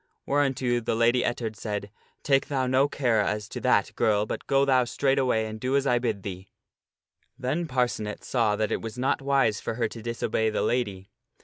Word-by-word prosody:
Whereunto 135 -4 +1
the 110 - -1
Lady 120 +2 +3
Ettard 115 -2 -2
said, 105 -1 -4 0.2
" - - -34
Take 135 -1 +2
thou 135 -2 0
no 130 +2 +3
care 120 -7 +1
as 105 0 -2
to - - -6
that, - - +2
girl, 105 -1 +2
but - - -6
go 135 0 +3
thou 130 -2 +4
straightway 125 -2 +1
and 110 0 -6
do 130 +4 0
as 140 0 +2
I 120 -3 +3
bid 110 -5 -2
thee." 95 -1 -7 0.9
Then 145 +6 -2
Parcenet 120 -6 -1
saw 115 -5 +1
that 110 0 -1
it - - -1
was 115 +1 -7
not 130 +3 0
wise 135 -6 +2
for - - -3
her 115 -1 0
to 115 - -9
disobey 115 -1 -1
the 110 - -1
lady. 100 -6 -2
120 Hz, 200 wpm, -26 LUFS, 110-130 Hz, 0.9 s, thou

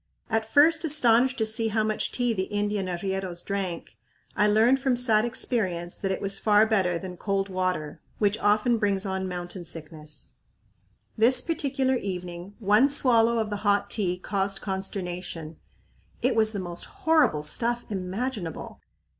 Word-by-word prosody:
At 225 0 -1
first 320 +3 +5
astonished 260 -4 +3
to 220 - +1
see 220 +1 0
how 220 0 +1
much 215 0 -1
tea 245 -2 0
the 190 -3 -1
Indian 205 -1 -2
arrieros 185 0 -3
drank, 185 - -4 0.4
I 210 - +3
learned 225 +5 +4
from 265 -2 +1
sad 235 -3 +2
experience 190 -8 -2
that 195 - -1
it 190 - -3
was 195 0 -2
far 210 0 +4
better 190 -6 +1
than 180 0 -8
cold 195 0 -1
water, 185 -5 -2 0.2
which 210 +1 +1
often 215 +3 +2
brings 200 -2 0
on 190 -1 -2
mountain 175 0 -6
sickness. 155 -2 -10 0.9
This 250 +3 +4
particular 270 -4 0
evening, 180 -1 -6
one 215 +5 +4
swallow 235 -5 +3
of 220 -2 -1
the 205 - -2
hot 205 -1 +1
tea 185 -5 0
caused 195 +1 -2
consternation. 180 -5 -5 0.7
It - - +2
was 220 -1 +3
the 205 - -4
most 175 -2 -5
horrible 310 - +2
stuff 235 +10 0
imaginable. 190 - -4
205 Hz, 155 wpm, -26 LUFS, 185-230 Hz, 0.9 s, first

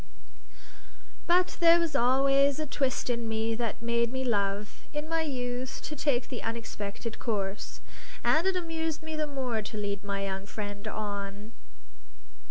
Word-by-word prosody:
But 360 +1 +4
there 340 0 +8
was 330 -4 0
always 275 +2 +5
a 310 - -1
twist 270 -2 0
in 235 -2 0
me 220 +1 +1
that 230 0 -2
made 235 0 +2
me 260 0 -1
love 205 -3 0
(in 300 +1 -2
my 330 0 +1
youth) 255 -3 -2
to 305 - -4
take 270 -4 +1
the 250 - -4
unexpected 225 -1 -4
course; 200 -3 -2 0.4
and 325 +4 +4
it 385 - +2
amused 325 -3 -2
me 315 0 -4
the 305 -1 0
more 255 -6 -1
to 215 +1 -6
lead 200 -1 -2
my 200 -1 -1
young 195 0 -3
friend 205 0 -5
on. 205 0 -4
240 Hz, 155 wpm, -30 LUFS, 210-295 Hz, 0.4 s, there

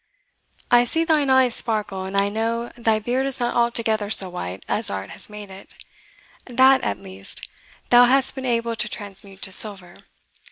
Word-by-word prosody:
I 240 0 +6
see 325 +7 0
thine 310 -4 +1
eye 260 -1 +4
sparkle, 210 -5 -1
and 190 +1 -4
I 200 0 +2
know 230 +3 -3
thy 225 -2 +1
beard 245 +5 -2
is 270 -1 +1
not 240 -1 -2
altogether 225 -3 0
so 195 -3 +5
white 95 - -7
as 215 +1 -2
art 95 0 -6
has - - -10
made 210 -2 -10
it 190 +1 -9 0.7
THAT, 260 +2 +4
at 100 - -2
least, 95 +1 -5 0.4
thou 245 0 +7
hast 265 +2 +3
been 265 - -7
able 230 -1 -1
to 215 - -1
transmute 195 -2 -10
to 190 - -1
silver. 185 -3 +3
225 Hz, 175 wpm, -22 LUFS, 195-245 Hz, 0.7 s, thou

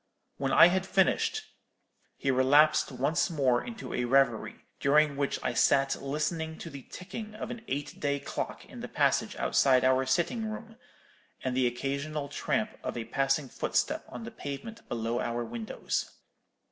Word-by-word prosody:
When 135 -1 -1
I 170 - +8
had 190 +1 0
finished, 195 - +2 0.7
he 135 - +1
relapsed 145 +4 +4
once 140 +9 +1
more 135 -7 +2
into 225 -3 -7
a 125 - 0
reverie, 135 +2 +1
during 150 +1 +4
which 140 0 -1
I 125 - 0
sat 135 +3 +3
listening 160 +3 -2
to 165 - -8
the 140 -1 -8
ticking 215 - -8
of - - -5
an 235 - -6
eight 145 +1 -4
day 140 -1 0
clock - - -5
in - - -11
the - - -5
passage - - +1
outside 130 -2 +3
our 130 0 +3
sitting 195 - 0
room, 225 +1 -8 0.7
and 130 -1 -1
the 130 -1 +3
occasional 140 +4 -3
tramp 215 +8 -1
of - - -3
a 115 - -3
passing 135 +2 +1
footstep - - -1
on 125 -2 -7
the 115 - -7
pavement 145 +12 -7
below 115 +1 -1
our 120 0 -2
windows. 115 -1 -3
140 Hz, 160 wpm, -29 LUFS, 130-165 Hz, 0.7 s, I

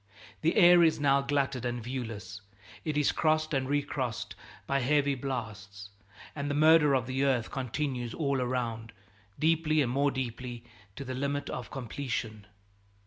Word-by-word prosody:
The 165 +2 +2
air 175 -3 +7
is 160 -2 +4
now 140 -1 +3
glutted 140 -3 -1
and 120 0 -2
viewless, 110 -5 -6 0.4
it 155 -2 -2
is 150 - +3
crossed 155 0 +1
and 135 -1 0
recrossed 140 -5 -2 0.3
by 140 - +1
heavy 140 +2 +2
blasts, 105 -7 -6 0.4
and 145 -1 -3
the 145 - -1
murder 155 -1 +5
of 130 -3 0
the 130 +2 -1
earth 130 -5 +1
continues 130 -2 -3
all 140 -4 0
around, 115 -2 -3 0.4
deeply 155 -1 +2
and 130 -5 +2
more 140 +2 +2
deeply, 125 -2 -5 0.3
to 140 - -7
the 130 - -4
limit 140 +2 -2
of 125 - -5
completion. 115 -5 -5
135 Hz, 150 wpm, -29 LUFS, 120-145 Hz, 0.4 s, air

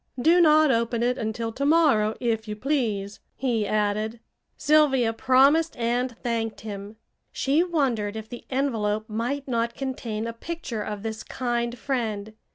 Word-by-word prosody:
"Do 335 +7 +5
not 310 -2 +6
open 235 0 0
it 250 +2 +1
until 225 +1 -3
to 265 +5 -4
morrow, 280 -9 +4
if 225 -2 -1
you 210 - -4
please," 215 -6 -1 0.2
he 235 -5 0
added. 215 +2 0 0.4
Sylvia 275 -6 +3
promised 275 +7 +3
and 240 +1 -1
thanked 230 -2 -2
him. 205 0 -7 0.4
She 290 +5 +2
wondered 255 - 0
if 220 0 -6
the 240 +1 -9
envelope 220 -6 -1
might 245 +6 -3
not 235 -2 -1
contain 235 -5 -4
a 230 - -4
picture 250 -4 -5
of 210 -1 -5
this 220 -1 -4
kind 240 -1 -2
friend. 220 -5 -3
235 Hz, 150 wpm, -25 LUFS, 220-270 Hz, 0.4 s, not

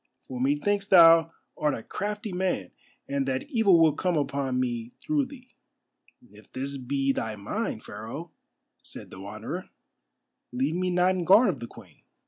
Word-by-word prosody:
For 125 -1 -8
methinks 195 +9 +1
thou 165 -4 +7 0.2
art 150 - 0
a 115 - -8
crafty 210 0 -4
man, 180 - -1 0.4
and 140 -1 -1
that 130 - -2
evil 210 - +5
will 160 -2 +5
come 180 +2 0
upon 140 -2 -1
me 120 -2 -2
through 295 -3 0
thee." 255 -2 -14 0.8
"If 105 +1 -18
this 140 +2 -4
be 135 +1 0
thy 110 -4 -3
mind, 110 - -4
Pharaoh," 115 +11 -8 0.5
said - - -11
the 95 - -10
Wanderer, 110 - -6 0.8
"leave 130 +5 -1
me 180 +1 -1
not 180 +1 +3
in 185 -1 -2
guard 200 +7 +6
of 150 -8 -2
the 120 - -6
Queen. 95 -11 -16
145 Hz, 160 wpm, -27 LUFS, 125-185 Hz, 0.8 s, thou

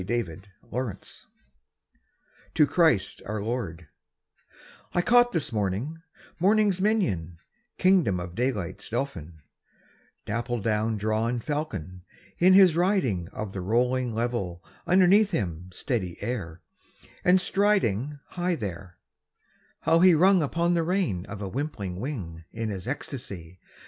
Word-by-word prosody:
12 - - -11 0.2
The 80 +2 -10 0.3
Windhover: 115 -5 -5 1.3
To 150 - +6
Christ 150 - +2
our 105 +1 -3
Lord 100 -7 -4 1.1
I 175 - +4
CAUGHT 245 +3 +5
this 155 -5 -1
morning 110 - -2 0.4
morning's 200 0 +3
minion, 100 - 0 0.4
king 185 0 +5
dom 95 -7 -1
of 90 -1 -6
daylight's 115 -5 -3
dauphin, 85 - -4 0.8
dapple 120 +3 -2
dawn 110 +1 0
drawn 110 +3 0
Fal 150 +5 -2
con, 90 - -8 0.4
in 185 +2 +6
his 185 -4 +7
riding 165 - +1
Of 100 +1 -6
the 95 - -4
rolling 120 +4 +1
level 110 -7 -2 0.2
underneath 190 +3 +5
him 90 - -3
steady 95 -3 -3
air, 90 -8 -4 0.6
and 180 +1 +5
striding 150 - +1
High 180 0 -1
there, 95 - -7 0.8
how 165 +1 +3
he 180 -1 +7
rung 185 +3 +5
upon 170 +4 +1
the 170 - +2
rein 165 - -1
of 105 -2 -7
a - - -3
wimpling 100 -7 -4
wing 95 - -5
In 115 -1 -3
his 100 +1 -6
ecstacy! 100 - -6
120 Hz, 130 wpm, -26 LUFS, -, 1.3 s, his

